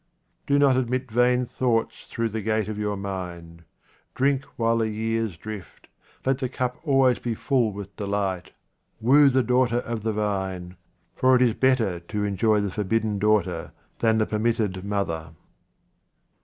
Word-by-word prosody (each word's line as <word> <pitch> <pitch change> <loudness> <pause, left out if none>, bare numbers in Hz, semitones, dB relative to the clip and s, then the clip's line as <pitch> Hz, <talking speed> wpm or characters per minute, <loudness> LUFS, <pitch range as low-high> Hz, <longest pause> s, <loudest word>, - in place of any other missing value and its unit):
Do 140 - +3
not 140 -2 +4
admit 130 0 -1
vain 125 +2 +3
thoughts 120 -2 -1
through 115 0 -1
the 110 +1 -4
gate 110 0 0
of 105 -1 -4
your 105 -1 -1
mind. 90 -4 -6 0.5
Drink 140 +1 +1
while 115 0 +1
the 110 -1 +1
years 110 -3 -2
drift, 105 -4 -9 0.4
let 135 0 +1
the 130 -2 -2
cup 125 +2 -3
be - - -19
always 135 -2 +4
full 120 0 0
with 100 0 -9
delight, 100 -3 -2 0.5
woo 140 +5 +6
the 130 -1 +2
daughter 125 0 +2
of 115 -2 -4
the 110 +1 -1
vine, 95 -4 -3 0.4
for 130 0 +4
it 125 - +3
is 120 -3 +3
better 115 -10 +2
to 105 +5 -4
enjoy 105 +1 +2
the 100 -2 -2
forbidden 105 +1 -1
daughter 95 -5 +1 0.3
than 110 -1 +3
the 110 - +2
permitted 110 -4 -1
mother. 85 -6 -3
110 Hz, 155 wpm, -25 LUFS, 100-125 Hz, 0.5 s, woo